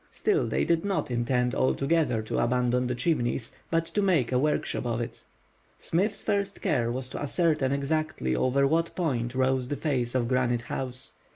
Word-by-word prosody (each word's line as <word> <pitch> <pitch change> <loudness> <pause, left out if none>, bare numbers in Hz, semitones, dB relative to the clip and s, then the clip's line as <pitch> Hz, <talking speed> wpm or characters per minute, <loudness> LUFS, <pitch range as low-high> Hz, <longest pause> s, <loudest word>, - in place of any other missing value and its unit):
Still 420 -1 +1
they - - 0
did 165 0 +2
not 195 -9 -1
intend 125 +1 +1
altogether 135 -3 +1
to 110 - -2
abandon 125 +1 +1
the 125 - -1
Chimneys, 120 -4 0 0.2
but 165 0 +1
to 205 - -1
make 170 - +2
a 125 - +3
workshop 150 +3 0
of 115 -1 -1
it. 120 0 -6 0.5
Smith's 195 +6 0
first 200 0 -1
care 130 - +1
was 125 +1 -3
to - - -6
ascertain 150 -2 +1
exactly 140 - -1
over 135 - +2
what 165 +4 +1
point 130 -8 -1
rose 130 -1 +1
the 145 - -2
face 130 -4 -1
of 120 -2 +1
Granite 120 -1 +1
House. 130 +1 -3
130 Hz, 175 wpm, -27 LUFS, 125-160 Hz, 0.5 s, a